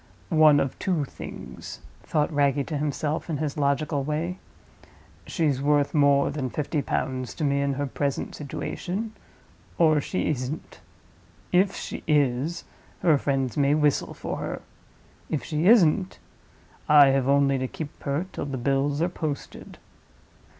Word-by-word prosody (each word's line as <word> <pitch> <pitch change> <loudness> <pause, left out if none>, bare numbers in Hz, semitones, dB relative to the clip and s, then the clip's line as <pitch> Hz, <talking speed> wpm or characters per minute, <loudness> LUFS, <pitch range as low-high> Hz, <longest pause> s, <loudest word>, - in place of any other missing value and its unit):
"One 155 -2 +6
of 135 - -2
two 170 -6 0
things," - - -9 0.2
thought 150 +1 0
Wragge 140 -1 +2
to 155 - -3
himself, 150 +2 -2
in 155 - -1
his 150 -1 -2
logical 145 0 0
way. 160 +5 -2 0.9
"She's 150 -7 0
worth 145 0 +2
more 140 -2 +4
than 140 -3 -3
fifty 150 +2 -2
pounds 130 -2 -3
to 155 - -4
me 140 -1 +2
in 140 0 0
her 145 +1 -2
present 140 0 -2
situation, 185 +8 -4 0.6
or 155 -3 +4
she 185 - -2
isn't. 135 +2 -5 0.7
If 190 +2 +3
she - - -6
is, 145 +2 +1 0.4
her 155 -5 +4
friends 135 -4 -1
may 140 0 +3
whistle 150 -2 +1
for - - -4
her. - - -5 0.7
If 145 -6 -2
she 155 +6 -1
isn't, 190 -4 +4 0.7
I 145 -2 +8
have 135 -1 +1
only 140 -1 +3
to 130 - -1
keep 150 +3 -8
her 145 +5 -1
till - - -4
the 135 -2 -4
bills 140 +4 0
are - - +2
posted." 155 -5 -6
145 Hz, 145 wpm, -25 LUFS, 140-155 Hz, 0.9 s, I